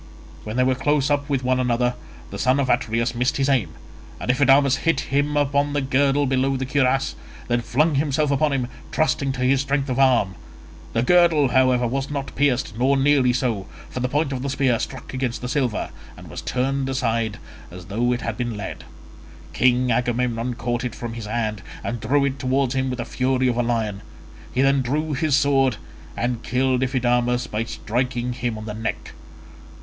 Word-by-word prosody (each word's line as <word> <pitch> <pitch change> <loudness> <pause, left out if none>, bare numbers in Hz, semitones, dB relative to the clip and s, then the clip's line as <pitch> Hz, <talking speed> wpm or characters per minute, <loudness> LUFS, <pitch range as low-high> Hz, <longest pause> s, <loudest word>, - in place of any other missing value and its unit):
When 110 +1 -5
they 125 - +4
were 130 0 +3
close 145 +2 +1
up 145 0 0
with 135 -2 0
one 130 0 +1
another, 125 0 +1 0.4
the - - -6
son 130 +3 +2
of 135 -2 0
Atreus 115 -1 0
missed 125 +3 0
his 135 -1 +1
aim, 125 - +2 0.5
and - - +1
Iphidamas 135 0 +4
hit 165 -1 +1
him 145 +1 +1
on 145 0 +1
the 145 - +1
girdle 135 +2 +2
below 135 0 +1
the 130 - -3
cuirass 135 0 +1 0.3
and - - -19
then 120 0 +1
flung 150 +7 +1
himself 145 +1 +1
upon 145 +2 +2
him, 130 -3 -1 0.2
trusting 155 -3 +1
to 125 - -5
his 130 +1 +3
strength 140 0 -1
of 130 +1 -1
arm; 125 -8 +3 0.6
the 115 - +1
girdle, 170 -3 +4
however, 130 -1 +3
was 135 +3 -2
not 140 -2 -4
pierced, 135 -5 +1
nor 135 +2 +3
nearly 135 -2 +4
so, 120 -6 -1 0.2
for - - -4
the 125 0 -1
point 145 0 0
of 125 - -3
the 140 - -2
spear 130 -4 +1
struck 130 0 -6
against 130 -2 -2
the 125 - -5
silver 125 -4 -1 0.3
and - - -12
was - - -6
turned 135 +1 -1
aside 115 -4 -1 0.3
as 90 0 -10
though 115 +5 0
it 120 0 -1
had 115 -2 -3
been 120 -3 -3
lead: 100 -2 -6 0.7
King 125 +7 +3
Agamemnon 120 0 0
caught 120 +1 -2
it 125 -3 -4
from 120 -1 -6
his 115 -2 -6
hand, 110 -2 -2 0.2
and 120 0 -3
drew 140 +6 +2
it 140 -1 -2
towards 130 0 +1
him 130 0 0
with 125 - -3
the 120 - -4
fury 130 +1 0
of 120 -1 0
a - - +3
lion; 110 -4 -1 0.5
he 130 - +1
then 135 0 +3
drew 150 +5 -1
his 150 0 +1
sword, 135 -5 +3 0.4
and 120 -1 -1
killed 130 +1 +1
Iphidamas 125 -1 +1
by 105 +2 -2
striking 125 +2 -2
him 120 -2 -3
on 110 - -7
the 105 - -5
neck. 110 +1 -4
130 Hz, 195 wpm, -22 LUFS, 120-140 Hz, 0.7 s, they